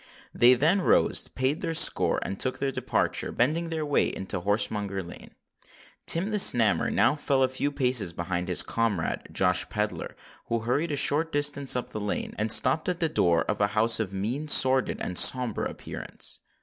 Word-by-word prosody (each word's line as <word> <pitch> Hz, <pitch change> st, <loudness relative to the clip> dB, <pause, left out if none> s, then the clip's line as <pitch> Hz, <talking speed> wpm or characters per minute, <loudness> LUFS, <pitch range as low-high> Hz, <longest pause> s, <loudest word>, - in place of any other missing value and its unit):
They 125 Hz, +2 st, +5 dB
then 165 Hz, +10 st, +1 dB
rose, -, -, +1 dB
paid 130 Hz, +4 st, -3 dB
their 165 Hz, -, -3 dB
score, -, -, +4 dB
and 95 Hz, -, -6 dB
took 130 Hz, -, -2 dB
their 140 Hz, -, -2 dB
departure,—bending 140 Hz, +4 st, -1 dB
their 160 Hz, -2 st, -4 dB
way 145 Hz, -, +1 dB
into 95 Hz, -1 st, -5 dB
Horsemonger 100 Hz, -1 st, -1 dB
Lane. 85 Hz, -, -13 dB, 0.7 s
Tim 185 Hz, +6 st, 0 dB
the 210 Hz, -, 0 dB
Snammer 110 Hz, -, +3 dB
now -, -, +2 dB
fell 140 Hz, -2 st, -1 dB
a -, -, +3 dB
few 130 Hz, +2 st, -3 dB
paces 125 Hz, -, -1 dB
behind 85 Hz, +1 st, -4 dB
his 90 Hz, -, +2 dB
comrade, 115 Hz, -7 st, -3 dB
Josh 90 Hz, -1 st, +2 dB
Pedler, 105 Hz, 0 st, -4 dB, 0.3 s
who 115 Hz, -1 st, -2 dB
hurried 140 Hz, +8 st, -2 dB
a -, -, -1 dB
short 155 Hz, +3 st, +1 dB
distance 140 Hz, -2 st, 0 dB
up 125 Hz, -, -4 dB
the 110 Hz, -, -6 dB
lane, 105 Hz, -, -4 dB
and 110 Hz, +1 st, +2 dB
stopped 135 Hz, +10 st, +2 dB
at 180 Hz, -1 st, -3 dB
the 165 Hz, -, 0 dB
door 85 Hz, -, +1 dB
of -, -, -4 dB
a 100 Hz, -, +3 dB
house 115 Hz, +1 st, +3 dB
of 105 Hz, -4 st, -3 dB
mean, 115 Hz, +10 st, -4 dB
sordid, 130 Hz, -3 st, +4 dB
and 90 Hz, -, +1 dB
sombre 125 Hz, -4 st, +3 dB
appearance. -, -, -7 dB
125 Hz, 180 wpm, -26 LUFS, 105-145 Hz, 0.7 s, They